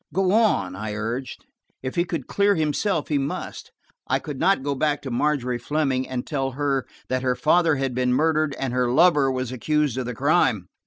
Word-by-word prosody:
"Go 185 +3 +1
on," 210 - +2
I 105 +1 -5
urged. 115 +5 -4 0.4
If 130 - -3
he 175 - +1
could 165 -7 -4
clear 200 0 +2
himself 160 +2 0
he 145 -2 +1
must. 135 +1 -5 0.4
I - - +2
could 145 -4 -7
not 185 -4 +2
go 140 0 -1
back 145 +2 0
to 135 - -5
Margery 125 -2 0
Fleming 130 0 -1
and 125 -1 -3
tell 135 -3 -2
her 140 -1 -1 0.2
that 130 0 -1
her 125 -1 +1
father 160 +4 +3
had 135 -2 -2
been 125 0 0
murdered 155 +1 +1
and 130 -2 -2
her 125 -1 +1
lover 150 -2 +4
was 130 -1 -3
accused 145 +1 0
of 125 - -3
the 125 - -4
crime. 125 - +1
135 Hz, 200 wpm, -24 LUFS, 125-155 Hz, 0.4 s, lover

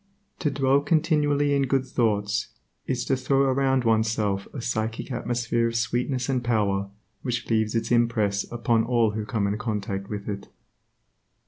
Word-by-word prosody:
To 150 - +1
dwell 135 0 +3
continually 145 -2 +2
in 140 -1 +1
good 135 0 +1
thoughts, 110 -3 0 0.4
is 125 -2 -1
to 135 - +2
throw 135 +1 +1
around 135 -1 +2
oneself 110 -3 +1
a 140 - -6
psychic 115 +1 -3
atmosphere 120 -1 0
of 115 - -4
sweetness 120 +3 0
and 130 -2 0
power 100 -4 +1 0.3
which 120 -1 -3
leaves 110 0 +1
its 115 - -1
impress 110 -4 +2
upon 115 -1 +1
all 115 -2 +2
who 105 0 -4
come 110 -5 0
in 100 +2 -1
contact 100 -3 -3
with 105 -1 -5
it. 100 -1 -5
115 Hz, 155 wpm, -25 LUFS, 110-130 Hz, 0.4 s, dwell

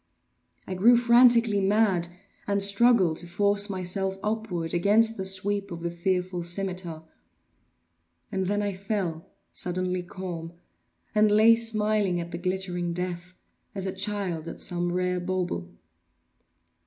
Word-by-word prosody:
I 190 - -5
grew 230 +6 +5
frantically 235 -3 +5
mad, 195 -3 +2 0.4
and 200 -1 +2
struggled 200 -4 +4
to 175 - -9
force 205 +3 +1
myself 190 0 -2
upward 210 -7 -2
against 215 +6 +3
the 190 - -4
sweep 200 +1 -2
of 170 -2 -7
the 170 0 -3
fearful 180 +1 -1
scimitar. 175 -2 -4 1.3
And 190 -1 -1
then 205 +1 0
I 200 -1 -1
fell 190 -4 -3 0.2
suddenly 180 0 -1
calm, 175 -2 -7 0.6
and 215 0 +4
lay 215 +2 +6
smiling 215 -5 0
at 170 0 -6
the 170 - -5
glittering 180 -1 -2
death, 180 0 -5 0.4
as 195 -1 -3
a 190 - -2
child 190 -5 -3
at - - -7
some 175 0 -1
rare 180 0 0
bauble. 175 - -3
190 Hz, 130 wpm, -26 LUFS, 175-205 Hz, 1.3 s, lay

